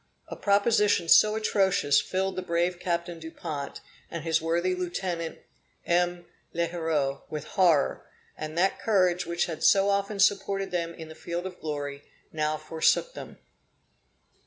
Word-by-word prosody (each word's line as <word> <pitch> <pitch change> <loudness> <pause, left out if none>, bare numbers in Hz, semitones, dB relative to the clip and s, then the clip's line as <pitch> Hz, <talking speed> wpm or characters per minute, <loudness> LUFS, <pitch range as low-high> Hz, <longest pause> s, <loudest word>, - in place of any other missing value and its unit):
A - - -5
proposition 205 -3 +2
so 215 +5 +6
atrocious 195 -8 +2
filled 190 0 -2
the 185 - -2
brave 175 0 -1
Captain 170 -1 -2
Dupont 160 -3 -6 0.3
and 170 - -6
his 160 -1 +1
worthy 170 +3 0
Lieutenant 175 -2 -3 0.5
M. 175 0 +1 0.3
L'Heureux 165 -5 -1
with 150 -2 -5
horror; 170 -7 +2 0.3
and 155 +1 -6
that 190 +2 +2
courage 185 -5 +2
which 170 0 0
had 165 -2 -6
so 195 0 +5
often 200 +1 -1
supported 195 0 +2
them 170 -1 -2
in 160 - -9
the 160 - -10
field 170 +2 -5
of 185 -1 -7
glory, 145 -2 -4 0.3
now 155 0 -1
forsook 165 - +1
them. - - -9
175 Hz, 140 wpm, -27 LUFS, 160-190 Hz, 0.5 s, so